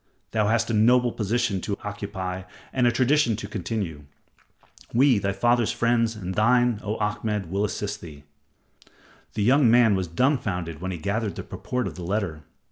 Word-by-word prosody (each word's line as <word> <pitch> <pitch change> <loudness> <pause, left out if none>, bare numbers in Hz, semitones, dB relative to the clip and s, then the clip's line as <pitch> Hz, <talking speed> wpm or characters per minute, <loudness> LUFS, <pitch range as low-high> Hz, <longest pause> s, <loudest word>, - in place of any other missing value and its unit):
Thou 110 -2 +1
hast 115 +1 +1
a - - -1
noble 120 +3 +4
position 110 -2 -1
to 100 +1 -3
occupy 95 -3 -5 0.3
and 125 -2 +3
a - - +4
tradition 130 0 +2
to 110 - -6
continue. 90 -7 -4 0.9
We, 130 -3 +5
thy 100 0 -1
father's 120 +4 +2
friends 115 -1 +1
and 95 -3 -5
thine, 120 +2 +3
O 105 +1 -2
Ahmed, 105 -3 -2
will 100 +2 0
assist 105 0 -3
thee." 75 -4 -11 1.1
The 105 - 0
young 130 +2 +5
man 115 -2 +5
was 95 -2 -1
dumbfounded 90 - -1
when 95 - -3
he 90 - -4
gathered 100 +4 -2
the - - -6
purport 125 -1 -4
of 95 - -4
the 90 - -6
letter. 90 -4 -2
105 Hz, 170 wpm, -25 LUFS, 95-120 Hz, 1.1 s, We